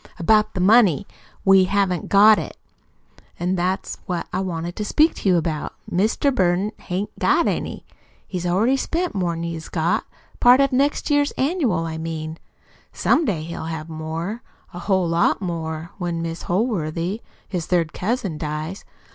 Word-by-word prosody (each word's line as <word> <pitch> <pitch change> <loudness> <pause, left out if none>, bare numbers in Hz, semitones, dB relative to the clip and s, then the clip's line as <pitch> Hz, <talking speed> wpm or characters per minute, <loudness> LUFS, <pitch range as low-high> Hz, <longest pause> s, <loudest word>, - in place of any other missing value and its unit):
"About 215 +5 +3
the - - -2
money 195 - +5 0.4
we 195 -1 +6
haven't 190 -3 0
got 210 +2 +7
it. - - -7 0.8
An' 180 +2 0
that's 185 +1 -2
what 175 -2 -2
I 185 - 0
wanted 175 -2 -3
to 210 - -2
speak 305 +10 +3
to 195 - 0
you 180 - +5
about. 160 -2 -2 0.2
Mr. 220 +9 +1
Burton 185 -2 +1
hain't 190 +3 -3
got - - +3
any. - - -3 0.4
He's 180 -2 -3
already 220 +10 +2
spent 345 +5 -2
more'n 170 -3 -1
he's 165 -1 -5
got 165 0 0 0.3
part 245 +2 +7
of 275 0 +3
next 280 +4 +1
year's 290 0 +2
annual, 265 - 0
I 160 -1 -4
mean. 160 0 -5 0.5
Some 325 - +2
day 175 - -1
he'll 165 0 -6
have 160 -1 -5
more 165 +7 -4 0.3
a 175 - -6
whole 190 -1 +1
lot 165 +1 +2
more 165 -3 -4
when 170 -2 -2
Mis' 165 0 -5
Holworthy, 180 -1 -1 0.3
his 175 -4 -4
third 170 -3 +1
cousin, 195 -6 -2
dies. 155 +4 -4
180 Hz, 160 wpm, -22 LUFS, 165-210 Hz, 0.8 s, got